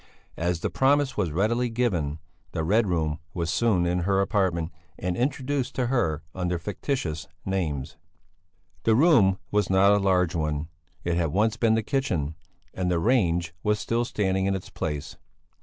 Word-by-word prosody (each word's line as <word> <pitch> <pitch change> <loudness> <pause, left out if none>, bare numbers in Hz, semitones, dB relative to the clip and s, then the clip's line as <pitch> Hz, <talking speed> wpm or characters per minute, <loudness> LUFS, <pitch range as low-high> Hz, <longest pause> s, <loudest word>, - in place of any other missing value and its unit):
As 85 0 0
the - - -1
promise 140 0 +2
was 100 -5 0
readily 115 +8 +1
given, 90 -11 0 0.4
the 80 - -1
Red 105 +6 +3
Room 80 -3 0 0.2
was 85 -3 -1
soon 95 -1 +2
in 90 +1 +1
her 95 +2 +1
apartment, 95 -5 +1 0.3
and 90 0 -2
introduced 135 +2 -1
to 125 -2 0
her 80 - +1
under 90 -1 -1
fictitious 85 - -3 0.2
names. 80 -8 -2 0.8
The 110 - +3
room 120 - +5
was 105 -2 +1
not 95 +1 +5
a - - +4
large 95 -3 +2
one; 75 -1 -2 0.3
it 85 0 0
had 85 -2 +2
once 105 +5 +2
been 115 -2 +3
the 115 - 0
kitchen, 90 - -1 0.4
and 90 -1 -1
the 90 - +2
range 85 -6 +2
was 105 0 +1
still 115 +2 0
standing 95 -4 0
in 100 - +1
its 95 - -7
place. 75 -2 -4
95 Hz, 165 wpm, -26 LUFS, 85-115 Hz, 0.8 s, room